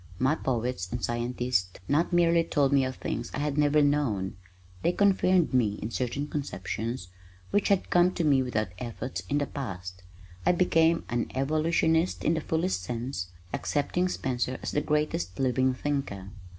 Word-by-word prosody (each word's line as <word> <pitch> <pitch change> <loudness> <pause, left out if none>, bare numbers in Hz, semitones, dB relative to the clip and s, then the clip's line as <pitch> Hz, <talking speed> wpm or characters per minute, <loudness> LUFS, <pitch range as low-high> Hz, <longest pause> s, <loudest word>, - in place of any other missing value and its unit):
My 130 +4 +3
poets 120 - -2
and 120 - -1
scientists 120 -5 -1
not 155 +6 +2
merely 170 -1 +4
told 145 -4 +1
me 140 -1 +5
of 130 0 -2
things - - -4
I - - -3
had 145 0 -1
never 150 0 +4
known, 130 -10 +1 0.5
they 175 - +2
confirmed 185 -5 +3
me 110 -5 +2
in 110 - -4
certain 130 +4 -2
conceptions 115 -5 -4 0.4
which 205 - +2
had 200 -2 +1
come 175 +1 +5
to 170 - -1
me 140 -4 +4
without 110 -6 -1
effort 125 +1 -4
in 145 - +1
the 145 - +1
past. 95 -10 -6 0.4
I - - +4
became 165 -2 +3
an 120 -1 -1
evolutionist 160 +4 +1
in 160 - +3
the 160 - -1
fullest 160 - 0
sense, 115 -1 -4 0.3
accepting 175 +5 0
Spencer 130 -4 -2
as - - -2
the 145 - +1
greatest 150 -13 -1
living 130 0 +2
thinker. 125 -10 -3
135 Hz, 165 wpm, -28 LUFS, 120-160 Hz, 0.5 s, me